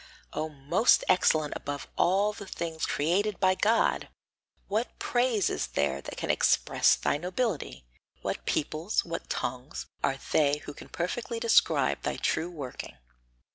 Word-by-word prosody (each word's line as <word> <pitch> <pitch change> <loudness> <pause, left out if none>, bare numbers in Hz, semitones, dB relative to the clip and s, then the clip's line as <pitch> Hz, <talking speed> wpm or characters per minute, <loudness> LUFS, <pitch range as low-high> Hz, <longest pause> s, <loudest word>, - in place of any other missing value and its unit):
O 155 - -2
most 155 - +3
excellent 155 -5 +3
above 145 0 -5
all 200 +4 +3
the 200 -2 -9
things 165 -3 -3
created 185 +7 0
by 185 0 +4
God! 220 +4 +2 0.6
What 220 +4 -2
praise 240 -6 +1
is - - -1
there 70 -1 0
which 70 - -8
can - - 0
express - - +3
thy - - 0
nobility? 175 - -3 0.4
What - - -4
peoples, 155 +6 0
what 165 0 -5
tongues, 125 +4 -4 0.2
are 135 - +1
they 145 -1 +3
who 145 - -7
can - - -12
perfectly 230 +7 -3
describe 230 -1 +3
thy - - -2
true 170 - 0
working? 140 - -7
170 Hz, 140 wpm, -28 LUFS, 145-205 Hz, 0.6 s, by